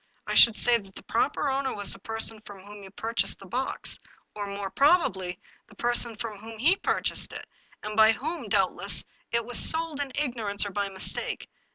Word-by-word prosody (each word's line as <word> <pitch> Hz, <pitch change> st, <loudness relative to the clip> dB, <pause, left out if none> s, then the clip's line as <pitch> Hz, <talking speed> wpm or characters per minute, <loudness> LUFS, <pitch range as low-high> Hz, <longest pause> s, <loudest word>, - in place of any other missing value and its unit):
I -, -, -4 dB
should 230 Hz, -2 st, +7 dB
say 240 Hz, 0 st, +3 dB
that 195 Hz, -2 st, -16 dB
the -, -, -10 dB
proper 295 Hz, -, -1 dB
owner 270 Hz, -1 st, -2 dB
was 205 Hz, -1 st, +1 dB
the 195 Hz, -, -9 dB
person 225 Hz, +1 st, -1 dB
from 200 Hz, -3 st, -13 dB
whom 205 Hz, 0 st, -12 dB
you 195 Hz, -, -12 dB
pur 225 Hz, +4 st, -7 dB
chased -, -, +1 dB
the 195 Hz, -, -14 dB
box, 255 Hz, +8 st, -5 dB, 0.3 s
or, 205 Hz, -1 st, -6 dB
more 200 Hz, -1 st, -6 dB
probably, 190 Hz, -, +1 dB, 0.3 s
the -, -, -19 dB
person 240 Hz, -1 st, +1 dB
from 215 Hz, -2 st, -7 dB
whom 225 Hz, +1 st, -11 dB
he 315 Hz, -, +6 dB
purchased -, -, -1 dB
it, -, -, -8 dB, 0.4 s
and 210 Hz, 0 st, -6 dB
by 220 Hz, 0 st, +6 dB
whom, 315 Hz, +9 st, -5 dB
doubtless, -, -, +1 dB, 0.3 s
it 235 Hz, -1 st, -1 dB
was 245 Hz, 0 st, +5 dB
sold 320 Hz, -2 st, +5 dB
in 280 Hz, -2 st, -5 dB
ignorance, 230 Hz, -8 st, 0 dB
or 205 Hz, -, -6 dB
by 200 Hz, 0 st, -3 dB
mistake. 190 Hz, -1 st, -4 dB
225 Hz, 200 wpm, -26 LUFS, 200-255 Hz, 0.4 s, should